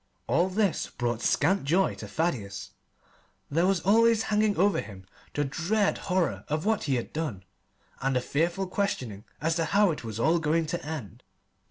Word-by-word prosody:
All 180 +2 +2
this 200 -1 0
brought 120 -2 -2
scant 185 +10 +2
joy 175 +7 +2
to - - -8
Thaddeus. 120 - -2 0.8
There 165 +5 +3
was 195 -3 +2
always 225 +2 +4
hanging 210 -1 +1
over 200 +3 +3
him 100 -2 -11 0.3
the 145 - +1
dread 180 +10 0
horror 165 - +1
of 155 +3 -2
what 220 -1 +1
he 135 - +1
had 120 - -4
done, 150 - -3 0.6
and 135 0 0
the 125 - +2
fearful 170 +8 0
questioning 130 - -2
as 165 +3 0
to 165 - +1
how 200 +4 +3
it 150 - -5
was 110 -1 -5
all 165 +7 +3
going 160 +1 +1
to 175 +2 -3
end. 145 - -6
165 Hz, 175 wpm, -28 LUFS, 130-195 Hz, 0.8 s, always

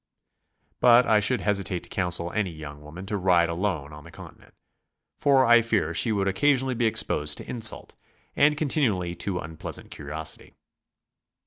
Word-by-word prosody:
But 125 0 +6
I 110 -2 +4
should 120 +4 +1
hesitate 100 -3 -1
to - - -13
counsel 90 -2 -2
any 105 -3 -1
young 75 -3 -10
woman 80 +6 -10
to 105 +1 -3
ride 90 -3 +3
alone 85 -5 -3
on 75 0 -11
the - - -13
Continent, - - -14 0.6
for 135 -2 +4
I 120 0 +6
fear 105 -8 -1
she 100 +7 +2
would 100 -2 0
occasionally 130 +6 +1
be 120 -1 +1
exposed 75 -8 +1
to - - -9
insult, 115 -3 -1 0.4
and 150 +1 +3
continually 115 - 0
to 95 -1 -3
unpleas 80 -2 -6
ant - - -15
curio 75 +2 -6
sity. 80 - -8
95 Hz, 170 wpm, -25 LUFS, 85-120 Hz, 0.6 s, But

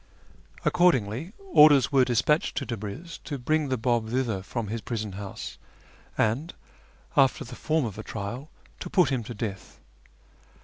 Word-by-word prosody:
Accordingly, 145 - +2
orders 155 - +6
were 135 -2 +5
despatched 125 +5 +1
to 140 - -1
I'abn'z 115 - -6
to 145 - -4
bring 150 +3 0
the 130 - 0
Biib 115 -1 0
thither 120 -5 -1
from 115 +4 -4
his 115 +1 -3
prison 110 -3 -4
house, 100 0 -7 0.6
and, 120 +10 0 0.6
after 135 +2 +4
the - - -10
form 155 -3 0
of 105 -2 -6
a - - -5
trial, 115 +9 -6 0.3
to - - -6
put 180 -7 +4
him 130 -3 0
to 120 - -7
death. 100 -3 -6
125 Hz, 150 wpm, -27 LUFS, 110-150 Hz, 0.6 s, orders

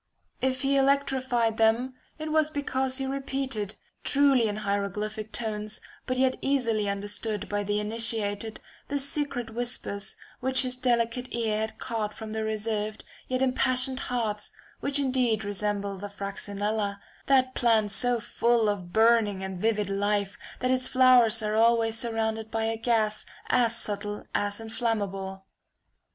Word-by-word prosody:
If 260 0 0
he 275 +1 +2
electrified 260 -4 +2
them, 230 +4 +2 0.2
it 310 0 -4
was 310 -1 +3
because 265 -3 -1
he 270 - -1
repeated, 265 -6 -3 0.3
truly 275 -5 +4
in 205 - -2
hieroglyphic 210 +2 -2
tones, 215 -2 -3 0.3
but 255 0 -1
yet 260 0 +2
easily 230 -7 +1
understood 205 +1 -3
by 205 0 -1
the 205 +1 -1
initiated, 220 -1 0 0.3
the 285 - -1
secret 280 -4 0
whispers 230 -4 -3 0.2
which 260 +1 +2
his 255 -1 0
delicate 245 -1 0
ear 220 -2 0
had 220 0 -3
caught 215 -2 -3
from 220 -1 -7
the 220 0 -2
reserved 215 0 -2 0.2
yet 255 +1 0
impassioned 255 0 +3
hearts, 220 -4 -2 0.3
which 280 0 +1
indeed 255 -5 +1
resemble 205 0 -2
the 205 +1 -6
Fraxinella, 200 +1 -3 0.3
that 260 -1 +4
plant 225 -4 +2
so 245 +3 +4
full 235 -1 +2
of 185 -4 -3
burning 220 -3 +3
and 190 -2 -5
vivid 215 -2 +1
life, 200 0 0 0.3
that 255 - +1
its 255 0 +2
flowers 245 -3 +5
are 210 0 -1
always 225 0 +3
surrounded 225 -1 -1
by 225 0 -1
a 225 0 0
gas 220 -2 0 0.3
as 230 -2 +3
subtle 205 -1 -1
as 205 +1 -1
inflammable. 200 -4 -3
225 Hz, 140 wpm, -27 LUFS, 210-255 Hz, 0.3 s, flowers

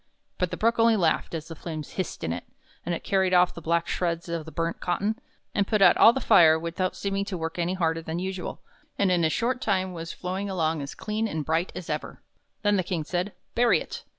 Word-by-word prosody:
But 180 - +1
the - - -5
Brook 230 +1 +2
only 230 0 +5
laughed 170 -3 +1
as 160 -1 -5
the 165 - -8
flames 155 -2 -6
hissed 185 - -4
in 80 - -1
it, - - -5 0.4
and 175 0 -1
it - - -7
carried 190 -2 +2
off 180 0 +5
the 170 - -9
black 170 +1 +1
shreds 170 -1 -1
of 165 -2 -3
the 160 - -9
burnt 165 +2 -2
cotton, 205 +6 -1 0.3
and 200 -2 +1
put 215 - +2
out 195 - +7
all 225 - +8
the 265 - -2
fire 160 -9 +6
without 170 +3 -2
seeming 200 0 -1
to 195 -3 -4
work 165 +1 -4
any 175 +2 0
harder 165 -2 0
than 160 +1 -4
usual, 185 0 -4 0.4
and 195 -2 +2
in 175 -2 +2
a 160 - +4
short 245 +8 0
time 190 -3 0
was 165 -1 -6
flowing 190 +3 -4
along 160 -4 0
as 140 - -6
clean 215 +1 -2
and 155 -7 -3
bright 165 +3 0
as 180 - -6
ever. - - -4 0.4
Then 205 -1 +3
the 185 - +1
King 170 -3 -2
said: 180 +5 -2
" - - -48
Bury 240 0 +4
it!" - - -7
180 Hz, 240 wpm, -26 LUFS, 165-195 Hz, 0.4 s, all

